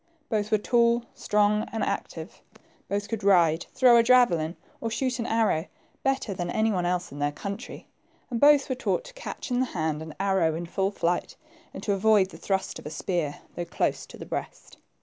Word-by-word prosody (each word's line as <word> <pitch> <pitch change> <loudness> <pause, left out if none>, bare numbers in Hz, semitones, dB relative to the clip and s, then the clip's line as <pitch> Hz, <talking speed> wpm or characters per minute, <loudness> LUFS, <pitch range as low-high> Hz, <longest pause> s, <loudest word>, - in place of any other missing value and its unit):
Both 215 -2 0
were 215 - +5
tall, 235 +2 +2
strong, 210 0 +1
and 225 - -2
active. - - -4 0.5
Both 205 +1 -1
could 225 -3 -4
ride, 170 -4 +4
throw 255 -2 +6
a - - +7
javelin, 205 -10 +3 0.3
or 230 - -2
shoot 255 +2 -1
an 230 - -2
arrow, 215 -7 +1 0.3
better 270 -6 0
than 175 -1 -4
any 220 +4 +1
one 180 -3 0
else 180 0 -1
in 145 - -8
their 145 0 +1
country, 200 +7 -7 0.4
and 235 - -1
both 290 -1 +6
were 260 - -1
taught 260 - -1
to - - -12
catch - - -7
in 245 - +1
the 260 - +1
hand 155 -1 -1
an 160 -1 -8
arrow 190 -5 +2
in 170 +1 -4
full 190 +3 -1
flight, 175 -3 -1 0.4
and 190 - -9
to 205 - +1
avoid 200 -1 +3
the - - -11
thrust 190 -1 -2
of - - -9
a - - -4
spear, 155 -1 -3
though 175 - -3
close - - -1
to - - -12
the - - -8
breast. - - -6
200 Hz, 205 wpm, -26 LUFS, 175-235 Hz, 0.5 s, a